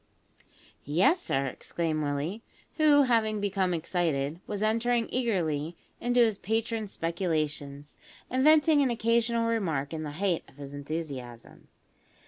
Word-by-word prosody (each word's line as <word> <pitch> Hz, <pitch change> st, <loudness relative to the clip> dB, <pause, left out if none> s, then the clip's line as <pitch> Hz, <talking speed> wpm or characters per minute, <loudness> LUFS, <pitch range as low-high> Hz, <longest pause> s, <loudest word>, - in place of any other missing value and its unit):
"Yes, 190 Hz, -, +3 dB
sir," 135 Hz, -, 0 dB
exclaimed 155 Hz, +4 st, -3 dB
Willie, 150 Hz, +8 st, -2 dB, 0.4 s
who, 295 Hz, -2 st, +6 dB
having 225 Hz, -4 st, +2 dB
become 195 Hz, -2 st, 0 dB
excited, 160 Hz, -3 st, -1 dB
was 205 Hz, 0 st, -2 dB
entering 230 Hz, +2 st, +1 dB
eagerly 170 Hz, -, -1 dB, 0.2 s
into 245 Hz, 0 st, +2 dB
his 220 Hz, -4 st, +2 dB
patron's 225 Hz, 0 st, -2 dB
speculations, 155 Hz, -4 st, -3 dB, 0.3 s
and 260 Hz, +1 st, 0 dB
venting 305 Hz, 0 st, +5 dB
an 270 Hz, -, +2 dB
occasional 230 Hz, 0 st, +1 dB
remark 165 Hz, -11 st, -1 dB
in 160 Hz, -, -3 dB
the 150 Hz, -2 st, -5 dB
height 180 Hz, +1 st, 0 dB
of -, -, -22 dB
his 140 Hz, -1 st, -9 dB
enthusiasm. 140 Hz, -5 st, -7 dB
185 Hz, 125 wpm, -28 LUFS, 150-230 Hz, 0.4 s, who